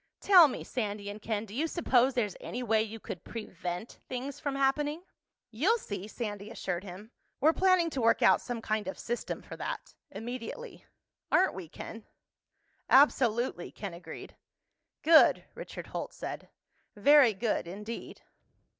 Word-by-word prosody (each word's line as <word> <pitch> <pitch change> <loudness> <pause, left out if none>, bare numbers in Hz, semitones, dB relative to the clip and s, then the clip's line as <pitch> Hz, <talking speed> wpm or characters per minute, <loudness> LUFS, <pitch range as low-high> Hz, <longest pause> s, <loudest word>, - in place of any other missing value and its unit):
"Tell 365 -5 +8
me, 265 - -5
Sandy 205 -4 -3
and 210 +1 -10
Ken, 215 0 -2
do 205 - -12
you 300 +8 0
suppose 265 -6 +2
there's 210 -6 0
any 250 +1 -4
way 220 -2 +3
you 220 +1 -5
could 180 - -7
prevent 180 -2 -6
things 260 +2 -5
from 285 -2 -2
happening?" 295 +4 +1 0.5
"You'll 325 - +2
see," 205 - -6
Sandy 210 -2 -5
assured 185 -5 -4
him. 200 +4 -10 0.3
"We're 310 +4 +5
planning 370 -3 +3
to 265 - -2
work 230 0 +3
out - - +6
some 235 -2 -5
kind 215 -3 -1
of 190 - -4
system 240 +1 -4
for - - -9
that—immediately. 250 - -7 0.5
Aren't 375 +1 +4
we, 180 -4 -8
Ken?" 225 +7 -9 0.9
"Absolutely," 245 -8 +3
Ken 200 -4 -6
agreed. 170 - -10 0.7
"Good," 320 0 +6
Richard - - -8
Holt - - -5
said. - - -7 0.5
"Very 255 +1 +6
good 215 -4 -1
indeed." 210 +6 -7
230 Hz, 145 wpm, -30 LUFS, 205-280 Hz, 0.9 s, Tell